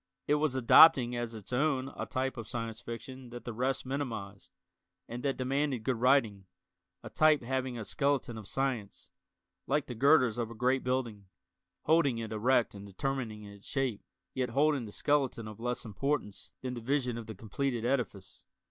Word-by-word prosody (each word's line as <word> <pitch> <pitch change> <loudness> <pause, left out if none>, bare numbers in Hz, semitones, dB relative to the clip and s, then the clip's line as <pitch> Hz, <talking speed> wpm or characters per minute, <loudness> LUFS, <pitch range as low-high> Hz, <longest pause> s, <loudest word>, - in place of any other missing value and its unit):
It - - +3
was 150 -4 +1
adopting 125 -1 +7
as 120 -1 -3
its 110 +3 -9
own 135 0 +1
a - - -4
type 130 +1 -2
of 115 -4 -7
Science 115 -2 -5
Fiction 125 +2 -8
that 120 0 -9
the 120 - -4
rest 130 +4 -1
minimized, 115 - -5 0.6
and 120 +1 -6
that 135 0 -1
demanded 135 -1 -1
good 125 +1 0
writing 115 -6 +2 0.6
a - - -7
type 155 -3 +4
having 130 0 -2
a 110 - -5
skeleton 140 0 0
of 110 -3 -8
science, 125 -7 -3 0.6
like 145 +1 +1
the 125 - -6
girders 125 -2 +4
of 115 -2 -1
a 115 - -9
great 125 +3 +1
building, 120 -6 -2 0.6
holding 150 -6 +3
it 115 -1 -5
erect 120 +2 +2
and 100 0 -9
determining 115 0 -3
its 100 -1 -12
shape, 130 -6 -1 0.3
yet 130 -1 -1
holding 140 0 +2
the 105 - -9
skeleton 135 -4 0
of 110 0 -9
less 125 +1 -3
importance 110 -2 -3
than 130 -1 -3
the 120 - -6
vision 125 0 0
of 115 -1 -7
the 110 - -7
completed 120 +2 -2
edifice. 120 -7 -2
125 Hz, 175 wpm, -31 LUFS, 110-135 Hz, 0.6 s, adopting